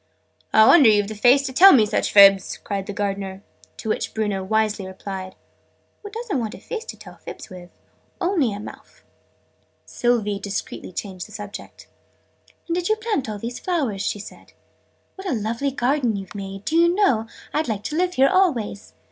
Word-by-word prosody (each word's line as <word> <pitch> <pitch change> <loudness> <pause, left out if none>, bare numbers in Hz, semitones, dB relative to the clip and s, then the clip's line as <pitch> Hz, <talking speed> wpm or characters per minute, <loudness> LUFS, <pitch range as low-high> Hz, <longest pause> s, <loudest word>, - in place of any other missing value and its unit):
"I 220 - +6
wonder 275 -2 +7
you've 205 -1 +2
the - - -5
face 250 +6 +4
to 265 -1 -4
tell 380 +8 +8
me 225 -5 +5
such 210 - -1
fibs!" 195 -2 +6
cried 195 -1 -5
the - - -4
Gardener. 195 -1 -4 0.3
To 220 - -6
which - - -2
Bruno 205 -3 -1
wisely 215 -1 0
replied 190 0 -7 0.7
"Oo 410 - -7
don't 440 - -3
want 225 -2 -4
a - - -12
face 465 -1 -6
to - - -8
tell - - -13
fibs - - -10
wiz 180 -1 -11 0.5
only 350 - +1
a 200 - -6
mouf." 210 - -12 0.8
Sylvie 210 - 0
discreetly 200 -2 -5
changed 185 -1 -6
the - - -17
subject. 205 -1 -9 0.8
"And 335 - -2
did 355 +2 -1
you 435 - +3
plant 430 - -2
all 210 - -4
these 235 +4 -6
flowers?" 280 - -1
she 210 - -1
said. 205 - -12 0.6
"What 385 +1 -7
a - - 0
lovely 230 +5 -2
garden 255 -3 0
you've 195 -2 -7
made! 195 -1 -7
Do 320 - -1
you 340 +1 +4
know, 260 - +2 0.3
I'd 310 +1 0
like 210 -3 -3
to 300 - -4
live 360 +2 0
here 270 +1 +5
always!" 245 - 0
220 Hz, 185 wpm, -22 LUFS, 200-300 Hz, 0.8 s, tell